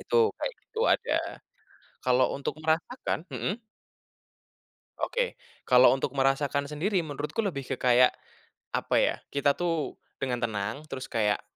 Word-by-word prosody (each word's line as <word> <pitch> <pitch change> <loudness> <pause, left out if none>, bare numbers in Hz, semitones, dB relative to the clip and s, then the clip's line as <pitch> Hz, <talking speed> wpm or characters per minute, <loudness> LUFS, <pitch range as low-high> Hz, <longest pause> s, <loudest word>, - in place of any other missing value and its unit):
Itu, 460 -2 +3
kayak - - -2
gitu 450 - -5
ada. - - +2 0.9
Kalau 125 0 +3
untuk 140 - -3
merasakan 160 +3 -1
hmm. 130 - -2 1.4
Oke, - - -1 0.3
kalau 125 +1 +7
untuk 135 - -1
merasakan 140 +1 +2
sendiri 165 +8 0
menurutku 150 +8 -3
lebih 140 -9 -2
ke - - -1
kayak, 125 0 +5 0.6
apa - - 0
ya - - +2 0.2
kita 140 0 +3
tuh 165 -3 -1 0.2
dengan 130 -3 0
tenang 110 -1 -1
terus 135 -3 -6
kayak, 105 -3 +1
140 Hz, 130 wpm, -28 LUFS, 125-165 Hz, 1.4 s, kalau